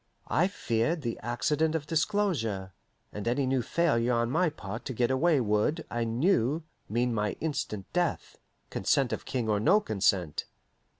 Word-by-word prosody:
I 175 +4 +3
feared 155 - -1
the 120 -2 -3
accident 150 +7 0
of 155 -2 -2
disclosure, 150 - 0 0.4
and 105 +2 -5
any 125 +3 +1
new 130 0 +1
failure 125 -5 +1
on 120 +1 +1
my 175 +4 +3
part 110 -6 -7
to 130 - -3
get 120 +1 +1
away 145 +3 +3
would, 115 +8 +1
I 120 0 -1
knew, 135 - +1 0.3
mean 120 +2 +1
my 105 -2 0
instant 140 -10 -3
death, 175 -3 -1 0.3
consent - - +1
of - - -4
King 120 -3 -2
or 105 -1 +2
no 195 - +5
consent. 95 - 0
125 Hz, 160 wpm, -29 LUFS, 110-160 Hz, 0.4 s, no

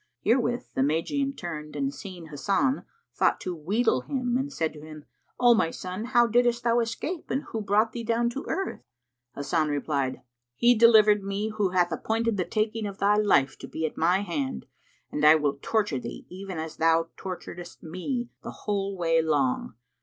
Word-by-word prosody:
Herewith 245 +1 +1
the - - 0
Magian 220 - 0
turned 150 -4 -6
and 140 -1 -1
seeing 180 -5 -9
Hasan, 200 - 0 0.3
thought - - +2
to 180 - -3
wheedle 190 - +1
him 250 - -2
and 270 +3 -1
said 160 - -1
to 150 - -11
him, 155 -1 -11 0.3
"O 245 -1 +7
my 220 -8 +2
son, 185 +5 -5
how 240 -1 +4
diddest 240 +1 +2
thou 235 0 +3
escape 240 +9 -3
and 270 +4 -1
who 220 - -2
brought 210 +2 +2
thee 235 0 -5
down 230 +1 +1
to 275 +4 -5
earth?" 385 +3 -3 0.5
Hasan 155 +2 0
replied, 140 -2 -1 0.3
"He 240 - +5
delivered 215 -3 +6
me, 200 +2 -2
who 210 -3 0
hath 180 -1 +2
appointed 225 -1 0
the 180 - 0
taking 215 0 -1
of 200 -1 -7
thy 205 +1 +3
life 170 -10 +3
to - - -8
be 160 - -3
at 155 - -4
my 180 +4 +2
hand, 145 - -3 0.5
and 150 - -2
I 155 +1 +9
will 145 -2 0
torture 205 - 0
thee 120 - -8
even 190 -1 -7
as 160 0 -5
thou 165 0 +3
torturedst 175 -2 -8
me 235 - -4
the - - -7 0.2
whole 200 -2 -1
way 165 -2 +3
long. 145 -8 0
195 Hz, 185 wpm, -27 LUFS, 160-230 Hz, 0.5 s, I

